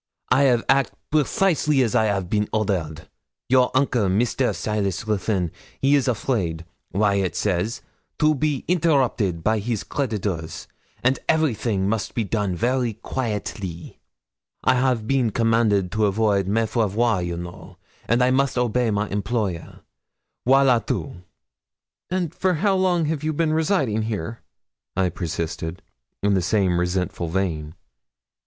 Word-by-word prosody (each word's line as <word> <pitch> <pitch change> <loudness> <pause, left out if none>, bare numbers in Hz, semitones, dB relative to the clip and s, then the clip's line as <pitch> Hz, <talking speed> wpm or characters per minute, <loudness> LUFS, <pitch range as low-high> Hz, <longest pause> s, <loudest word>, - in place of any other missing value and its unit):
'I 135 +2 +5
'av 120 -2 +2
act 135 +1 +3 0.2
precisally 150 -3 +2
as 115 - -1
I 110 -3 +3
'av 100 -3 -1
been 105 +2 0
ordered. 90 -8 -2 0.4
Your 130 -1 +4
uncle, 125 -7 +2
Mr. 120 +6 +1
Silas 105 -2 -2
Ruthyn, 100 -4 0 0.3
he 135 +1 +3
is 140 -2 +3
afraid, 100 -9 -1 0.3
Waiatt 100 -2 +1
says, 105 +4 -1 0.3
to 155 0 +4
be 150 -1 -1
interrupted 130 - +1
by 110 +2 +2
his 110 0 -2
creditors, 100 - -3 0.4
and 130 +2 +2
everything 115 -11 +1
must 110 +1 -2
be 115 - +1
done 100 -3 -1
very 120 +3 0
quaitly. 105 -7 -5 0.6
I - - +4
have 125 -3 +1
been 130 -3 +2
commanded 110 -4 +2
to 105 -1 +2
avoid 100 -1 +1
me 110 +3 +2
faire 110 0 +1
voir, 110 -1 +1
you 85 -1 -3
know, 85 0 -9 0.3
and 120 +2 +3
I 125 - +3
must 135 0 +1
obey 125 0 +1
my 105 0 0
employer 100 -4 -3 0.7
voilà 130 -3 +5
tout!' 130 - -3 0.9
'And 180 -3 -1
for 185 0 +1
how 195 +5 +2
long 185 -3 +2
have 155 -1 -2
you 155 0 0
been 155 0 +1
residing 155 - +1
here?' 110 0 -4 0.6
I 95 -1 +2
persisted, 85 +1 -4 0.4
in 100 0 +3
the 95 - +2
same 90 -1 +1
resentful 90 -1 -1
vein. 80 -3 -2
110 Hz, 140 wpm, -23 LUFS, 95-130 Hz, 0.9 s, I